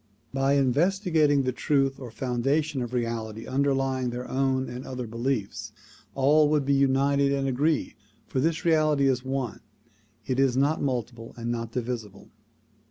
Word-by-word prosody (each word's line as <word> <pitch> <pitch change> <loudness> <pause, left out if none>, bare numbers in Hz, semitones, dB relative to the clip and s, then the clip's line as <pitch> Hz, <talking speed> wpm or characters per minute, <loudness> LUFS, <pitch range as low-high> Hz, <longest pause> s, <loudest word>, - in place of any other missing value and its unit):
By 135 +1 +2
investigating 150 - +2
the 130 - 0
truth 135 +1 0
or 130 -3 -7
foundation 135 +4 -1
of 120 -1 -4
reality 115 -2 -3
underlying 135 -2 0
their 125 +1 -5
own 130 0 0
and 125 +1 -6
other 125 -2 -5
beliefs, 115 -1 -3 0.4
all 145 +3 +4
would 150 -2 +1
be 140 - +2
united 140 +1 +3
and 135 -1 0
agreed, 145 +4 0 0.3
for 130 - -2
this 160 +4 0
reality 155 -4 +3
is 130 -2 +1
one; 130 -3 -3 0.7
it 130 0 -1
is 135 -2 +3
not 145 +4 +2
multiple 120 -4 -3
and 120 0 -3
not 115 -1 -3
divisible. 115 -5 -5
135 Hz, 150 wpm, -26 LUFS, 125-140 Hz, 0.7 s, all